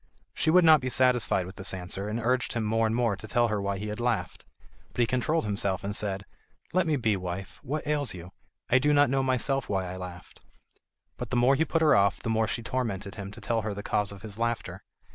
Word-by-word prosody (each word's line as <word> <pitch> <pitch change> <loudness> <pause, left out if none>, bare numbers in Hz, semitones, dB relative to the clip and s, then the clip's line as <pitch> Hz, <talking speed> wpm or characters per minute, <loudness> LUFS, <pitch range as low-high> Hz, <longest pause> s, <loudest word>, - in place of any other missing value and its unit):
She 160 - 0
would 180 +1 +6
not 155 -3 +7
be 130 - -2
satisfied 125 -7 +3
with 95 +2 -10
this 95 -1 -3
answer, 95 +3 -5
and 110 +2 -2
urged 125 +2 0
him 115 - -1
more 110 +1 +2
and 110 - -1
more 115 -4 +1
to 105 +3 -9
tell 120 +1 +2
her 105 -2 -1
why 100 0 -1
he 105 +2 -5
had 105 - -5
laughed. 115 -8 -2 0.5
But - - 0
he - - +5
controlled 125 +5 0
himself 100 -2 -1
and 100 +1 -3
said: 100 -1 -2 0.5
"Let 185 -1 +2
me 155 - +2
be, 110 -6 +1
wife; 95 +1 -6
what 150 +4 -4
ails 145 -7 -1
you? 90 +1 -10 0.4
I 125 - +4
do 145 +3 +3
not 145 -2 +4
know 135 0 +2
myself 130 0 0
why 95 -2 0
I 90 +1 -6
laughed." 90 -1 -9 0.8
But - - -5
the - - -2
more 125 +3 +5
he 155 +4 +2
put 165 0 +1
her 155 - +6
off, 100 0 +3
the 115 - -1
more 110 0 +2
she 115 +1 -3
tormented 110 -6 -3
him 100 -2 -7
to 110 +3 -11
tell 115 +1 0
her 105 -1 -3
the 100 - -6
cause 105 -1 0
of 100 0 -11
his 105 0 -8
laughter. 115 -6 -2
110 Hz, 245 wpm, -28 LUFS, 100-130 Hz, 0.8 s, not